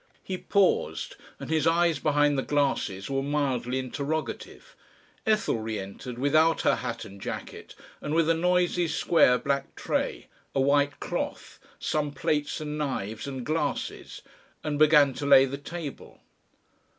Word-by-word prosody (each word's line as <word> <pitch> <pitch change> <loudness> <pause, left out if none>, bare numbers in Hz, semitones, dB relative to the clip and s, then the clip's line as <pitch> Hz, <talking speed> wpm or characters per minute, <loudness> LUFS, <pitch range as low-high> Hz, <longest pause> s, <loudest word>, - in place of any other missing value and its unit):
He 190 - -4
paused, 200 -2 +1 0.2
and - - -6
his 160 0 +2
eyes 165 -2 +3
behind 145 -1 +2
the 135 - +1
glasses 135 -10 0
were 135 0 -1
mildly 135 -3 -1
interrogative. 140 +4 -4 0.5
Ethel 215 - +2
re 110 0 -3
entered 100 +5 -7
without 155 +5 +3
her - - +3
hat 120 -2 -4
and 100 0 -12
jacket, - - -7 0.3
and 150 - -2
with 165 -1 +3
a 165 - +4
noisy 180 +1 +2
square 155 -4 +4
black 140 +1 -2
tray, - - -2 0.3
a - - +2
white 140 +1 +2
cloth, - - -4 0.2
some 150 -1 -1
plates 150 0 -1
and 150 0 -4
knives 115 -5 -3
and 130 -3 -5
glasses, 155 +1 -3 0.4
and 150 -1 -2
began 150 -3 +6
to 140 - -4
lay 135 -1 +8
the 140 +1 -5
table. 155 -1 -8
145 Hz, 145 wpm, -27 LUFS, 130-155 Hz, 0.5 s, lay